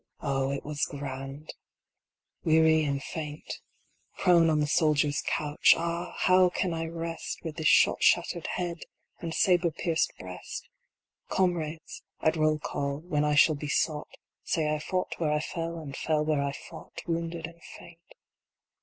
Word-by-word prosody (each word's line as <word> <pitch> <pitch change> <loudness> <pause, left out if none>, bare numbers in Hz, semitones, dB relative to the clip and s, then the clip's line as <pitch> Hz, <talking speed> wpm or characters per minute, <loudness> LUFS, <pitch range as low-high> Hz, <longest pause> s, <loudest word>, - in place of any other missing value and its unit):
Oh, 135 -1 0
it 140 0 -4
was 150 -1 -2
grand! 140 +1 -6 0.9
Weary 160 0 +4
and 140 -2 -1
faint, 150 -2 -6 0.6
Prone 170 -3 +5
on 155 -1 +2
the 150 - +2
soldier 150 0 +3
s 145 - -1
couch, 150 -1 +4
ah! 170 +1 -3
how 185 0 +5
can 175 0 -1
I 165 0 -2
rest 165 0 -5
With 160 -2 -6
this 160 -2 +1
shot - - +5
shattered 170 - +2
head 175 -2 -3 0.4
and 165 -2 -4
sabre 175 0 +3
pierced 165 +1 0
breast? 90 0 -8 0.6
Comrades, 165 -4 -1 0.2
at 155 - +2
roll 155 -1 +2
call, 140 -1 -3
when 155 -3 0
I 150 0 +2
shall 155 +2 +6
be 150 0 -5
sought, 150 +1 0 0.3
Say 155 -2 0
I 155 - -1
fought 185 +4 -3
where 155 -3 +1
I 150 - +2
fell, 165 +1 -4
and 145 -4 -7
fell 155 -1 0
where 150 -2 +1
I 140 0 -1
fought, - - -10
Wounded 165 -1 -2
and 170 +1 -12 0.2
faint. 170 -1 -14
160 Hz, 160 wpm, -28 LUFS, 150-170 Hz, 0.9 s, shall